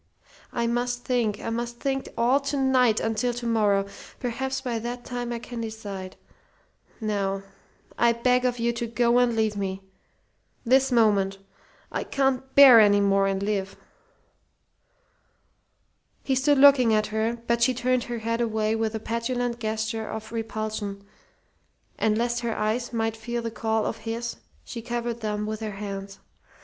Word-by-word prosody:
I 235 - -1
must 245 +1 -1
think. 235 -5 0
I - - -4
must 235 +1 -4
think 270 -1 -2
all 245 +4 +3
to 280 +1 -3
night, 255 -4 +3
until 230 +2 -1
to 240 0 -5
morrow. 210 -4 +2 0.3
Perhaps 265 +2 -3
by 240 -3 -2
that 240 +2 -6
time 245 -1 -4
I 235 - -2
can 235 0 -7
decide. 205 -4 -6 0.8
Now 200 -3 -1 0.6
I 235 0 +5
beg 250 +2 +2
of 250 -1 0
you 235 0 0
to 235 0 -3
go 235 +1 +2
and 245 -2 +2
leave 220 -1 +1
me 195 -1 -3 0.8
this 265 +2 +4
moment. 205 -5 +3 0.5
I - - -2
can't 265 -1 -1
bear 270 -4 +10
any 205 -1 +6
more 195 -1 +3
and 195 0 -1
live." 200 -2 -2 2.5
He 270 - 0
stood 275 +2 +3
looking 265 -5 +6
at 215 0 0
her, 225 +2 0
but 235 0 +1
she 255 +1 +3
turned 250 0 0
her 240 -1 -4
head 230 +1 -2
away 220 -1 0
with 225 0 -1
a - - -2
petulant 235 +2 -2
gesture 220 0 -2
of 220 0 -6
repulsion; 215 -3 -4 1.0
and 215 -1 +2
lest 240 +1 0
her 235 -2 -3
eyes 220 +3 -1
might 225 -1 -1
feel 235 +1 -4
the 230 - -3
call 220 -1 -1
of - - -2
his 230 +1 -4 0.3
she 235 - -7
covered 235 0 -3
them 210 -1 -2
with 215 0 -4
her 215 -2 -4
hands. 195 -1 -6
230 Hz, 160 wpm, -25 LUFS, 215-245 Hz, 2.5 s, bear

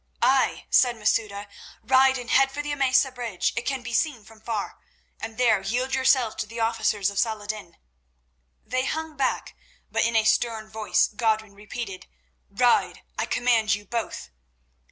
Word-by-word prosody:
"Aye," 265 0 +2
said 245 -2 +4
Masouda, 210 -2 -1 0.4
"ride 265 +2 +4
and 245 -2 -6
head 270 0 +4
for 290 +2 -4
the 295 - -3
Emesa 270 -1 +3
bridge—it 235 -7 -2
can 270 -3 -2
be 240 -1 -6
seen 245 -5 0
from 220 -1 -17
far—and 225 0 -7
there 230 -5 +3
yield 250 +7 -2
yourselves 260 -3 +3
to 210 - -3
the 230 +2 -8
officers 220 -3 +1
of 200 - -3
Salah 220 -3 0
ed 205 - -13
din." 205 -6 -6 0.9
They 255 +1 -1
hung 320 +1 -3
back, 270 - -1 0.4
but - - +1
in 230 0 0
a 220 - +4
stern 220 -1 +1
voice 220 -1 +2
Godwin 220 -1 -1
repeated: 205 -1 -7 0.4
"Ride, 240 +5 +2 0.2
I - - -1
command 230 -4 +2
you 205 0 -11
both." 225 - -4
230 Hz, 160 wpm, -25 LUFS, 215-255 Hz, 0.9 s, said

